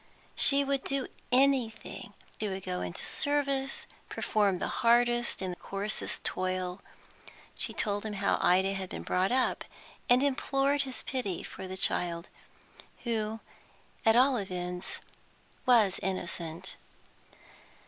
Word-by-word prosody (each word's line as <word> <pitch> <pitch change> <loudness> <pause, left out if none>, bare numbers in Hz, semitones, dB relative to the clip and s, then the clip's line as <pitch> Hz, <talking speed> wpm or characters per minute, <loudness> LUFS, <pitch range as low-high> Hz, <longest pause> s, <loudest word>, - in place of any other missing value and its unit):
She 280 0 +5
would 275 -1 0
do 275 -2 -1 0.3
anything, 255 -3 +1 0.3
would 195 -3 -2
go 90 0 -2
into 90 -1 -4
service, 275 -2 0 0.2
perform 205 -3 +1
the - - -2
hardest 240 -2 +3
and 180 -1 -3
coarsest 200 +2 -2
toil. 185 0 -2 0.7
She - - 0
told 205 -1 -1
him 210 - -4
how 200 0 +1
Ida 190 +2 +4
had 190 -1 -4
been - - -6
brought 185 +3 +1
up, 255 +1 +1 0.5
and 250 +2 +6
implored 280 0 +2
his 265 -2 -4
pity 210 -10 -3
for 190 - -8
the 190 0 -6
child, 170 -1 0 0.7
who 220 -2 -2 0.6
at 225 0 +5
all 255 +1 +5
events 180 -2 -3 0.7
was 220 -7 +5
innocent. 175 -1 -4
210 Hz, 120 wpm, -30 LUFS, 185-255 Hz, 0.7 s, and